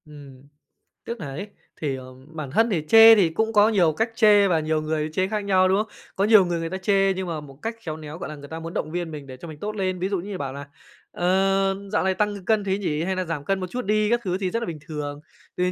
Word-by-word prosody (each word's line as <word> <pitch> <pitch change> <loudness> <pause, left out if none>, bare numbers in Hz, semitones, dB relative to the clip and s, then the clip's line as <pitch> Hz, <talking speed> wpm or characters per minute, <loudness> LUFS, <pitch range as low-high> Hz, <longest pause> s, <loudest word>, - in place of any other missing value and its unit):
Ừm, 140 -3 -14 0.6
tức 235 - -5
nà 160 - -5
ấy, 150 +10 -6 0.3
thì, 145 -4 -1
ờ, 130 0 -10
bản 155 -4 -7
thân 225 - +3
thì 170 -8 -1
chê 225 0 +9
thì 190 -6 +3
cũng 220 +7 -1
có 210 0 +5
nhiều 180 -8 +3
cách 225 +8 -1
chê 210 -3 +5
và 170 -4 +2
nhiều 155 0 -1
người 155 0 -2
chê 185 +3 +1
khác 210 0 -3
nhau, 185 -2 +4
đúng 190 - +3
không? 215 +1 -1 0.3
Có 195 - 0
nhiều 210 -3 +6
người 175 -1 -2
người 165 0 -3
ta 190 - -4
chê 195 0 +2
nhưng 190 0 -4
mà 160 -3 -4
một 135 -2 -14
cách 225 +1 -3
khéo 155 -6 -5
néo, 155 0 -8
gọi 175 - -6
là, 155 - -7
người 145 -1 -11
ta 160 - -6
muốn 165 +1 -7
động 155 - -3
viên 175 -1 -3
mình 145 -3 -8
để 130 -1 -9
cho 170 - -10
mình 155 -2 -10
tốt 210 +1 -4
lên. 185 -2 -2
Ví 185 +2 -1
dụ 200 - 0
như 195 +2 -6
bảo 135 -4 -4
là 140 +1 -8 0.4
"Ờ, 195 +2 +1 0.2
dạo - - +2
này 190 0 +1
tăng 205 -2 -2
cân 220 -2 +2
thế 195 -1 0
nhỉ? 160 -6 -2
Hay 190 +2 -1
nà 185 0 -2
giảm 160 -4 -4
cân 195 -1 0
một 185 - -4
chút 250 -2 -4
đi." 210 +1 +2
các 240 +1 +2
thứ 185 -1 -1
thì 190 -2 -2
rất 230 - -1
là 235 - -3
bình 165 -3 -5
thường. 145 -2 -5 0.4
Thì 180 0 +1
185 Hz, 290 wpm, -24 LUFS, 155-205 Hz, 0.6 s, chê